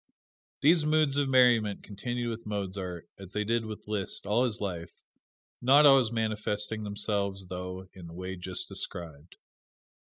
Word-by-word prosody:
These 160 +2 +5
moods 155 -2 +2
of 140 -2 +1
merriment 120 -5 +4
continued 120 +4 -4
with 115 -1 -7
Mozart, 95 -4 -4
as 95 -1 -10
they 105 - 0
did 115 +1 0
with 110 -1 -7
Liszt, 105 -3 0
all 110 +5 +2
his 115 -3 -1
life 90 -4 -4 0.7
not 140 +4 +6
always 135 -5 +6
manifesting 110 -1 -2
themselves, 100 -2 -2
though, 90 +1 -6
in 90 -3 -11
the 85 - -11
way 95 +1 -5
just 90 0 -4
described. 80 -1 -6
105 Hz, 145 wpm, -29 LUFS, 95-120 Hz, 0.7 s, not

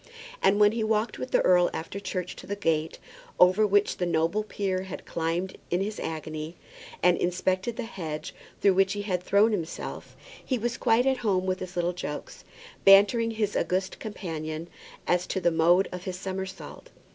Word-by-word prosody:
And 205 +2 +4
when 205 0 +6
he 225 0 -2
walked 215 +1 0
with 255 - -4
the - - +3
earl 180 -1 +5
after 165 +5 -5
church 185 -2 -4
to - - -11
the 200 - -2
gate 160 -5 -1 0.4
over 185 +4 +6
which 205 0 +2
the 180 - -1
noble 165 +5 +1
peer 195 -3 -2
had 190 -1 -8
climbed 170 +3 -2
in 175 - +1
his 205 +2 -3
agony, 155 +1 -5 0.5
and 180 0 +4
inspected 185 +5 0
the 245 - -4
hedge 165 -9 -6 0.3
through 200 - +5
which 195 +1 +3
he 205 0 -4
had 185 -3 -1
thrown 200 +4 +3
himself, 175 -6 -5 0.3
he 260 - -1
was 240 +1 -2
quite 230 +3 +3
at 265 -1 +2
home 200 -6 0
with 185 0 -1
his 185 0 -7
little 175 0 0
jokes, 150 -4 -6 0.4
bantering 205 +4 +6
his 215 -2 -2
august 185 +1 -1
companion 165 -6 -5 0.4
as 180 0 +1
to - - -1
the 175 -2 +2
mode 170 +4 +4
of 180 0 -7
his 185 -2 -4
somersault. 190 0 -6
185 Hz, 180 wpm, -27 LUFS, 175-205 Hz, 0.5 s, when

